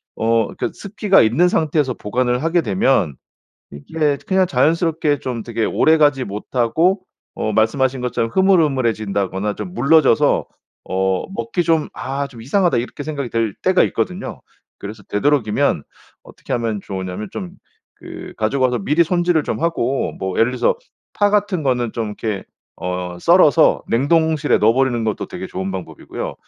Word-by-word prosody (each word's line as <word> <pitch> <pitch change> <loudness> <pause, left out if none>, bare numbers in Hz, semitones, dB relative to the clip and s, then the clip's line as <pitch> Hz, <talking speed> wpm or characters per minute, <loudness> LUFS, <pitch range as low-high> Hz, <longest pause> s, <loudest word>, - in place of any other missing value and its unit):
어 115 -1 +1
그 - - -2
습기가 200 0 +2
있는 140 +12 +3
상태에서 150 -6 +1
보관을 125 +4 -1
하게 165 +1 +2
되면 100 - +1 0.6
이게 145 - -1
그냥 190 -2 +3
자연스럽게 155 +1 +1
좀 125 -4 -4
되게 115 -2 -2
오래가지 150 -4 +3
못하고 125 - 0 0.3
어 110 - -2
말씀하신 130 +4 +1
것처럼 115 -2 -1
흐물흐물해진다거나 110 - +1
좀 95 -4 -7
물러져서 140 - +3 0.4
어 95 0 0
먹기 195 -3 -2
좀 160 -2 +1
'아 140 +1 -4
좀 120 -4 -13
이상하다.' 175 - +1
이렇게 125 +4 -4
생각이 140 -4 -4
들 115 -3 -1
때가 - - +4
있거든요. - - -4 0.4
그래서 105 +1 -8
되도록이면 125 - +1 0.4
어떻게 - - -8
하면 115 -3 -1
좋으냐면 95 +1 -5
좀 185 -3 -6 0.5
그 - - -9
가져와서 125 +2 +1
미리 150 - +2
손질을 175 -2 +1
좀 - - -3
하고 135 -6 -1
뭐 95 -1 -3
예를 115 +2 +3
들어서 130 - +1 0.4
파 205 0 +2
같은 205 -5 0
거는 125 -4 0
좀 115 -2 -2
이렇게 105 -1 -4 0.3
어 90 0 -4
썰어서 170 - +4
냉동실에 155 +5 +2
넣어 110 +2 +5
버리는 125 -2 +1
것도 110 -1 -2
되게 - - -7
좋은 95 +1 -4
방법이고요. 85 -5 -6
130 Hz, 345 characters per minute, -19 LUFS, 110-160 Hz, 0.6 s, 넣어